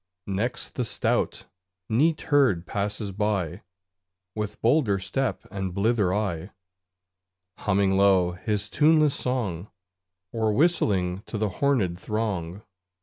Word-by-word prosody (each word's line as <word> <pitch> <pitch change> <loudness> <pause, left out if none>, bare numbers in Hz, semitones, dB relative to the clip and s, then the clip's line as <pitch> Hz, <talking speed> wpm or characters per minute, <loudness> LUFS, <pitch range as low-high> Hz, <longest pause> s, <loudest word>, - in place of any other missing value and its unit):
Next 110 +5 -2
the 125 - -1
stout 115 - -1 0.4
Neat 150 +8 +2
herd 130 - +3
passes 100 +1 -3
by, 95 -3 -1 0.7
With 105 -1 -4
bolder 115 -5 +3
step 125 +8 -2
and 95 -3 -4
blither 105 -2 +2
eye; 95 -3 -2 1.1
Humming 100 -1 +2
low 95 -3 +4
his 105 +3 -2
tuneless 155 +3 +4
song, 105 -8 -2 0.6
Or 110 -2 0
whistling 100 - +2
to 110 - -4
the 105 0 0
hornèd 95 -6 0
throng. 105 -3 -3
105 Hz, 110 wpm, -26 LUFS, 95-120 Hz, 1.1 s, low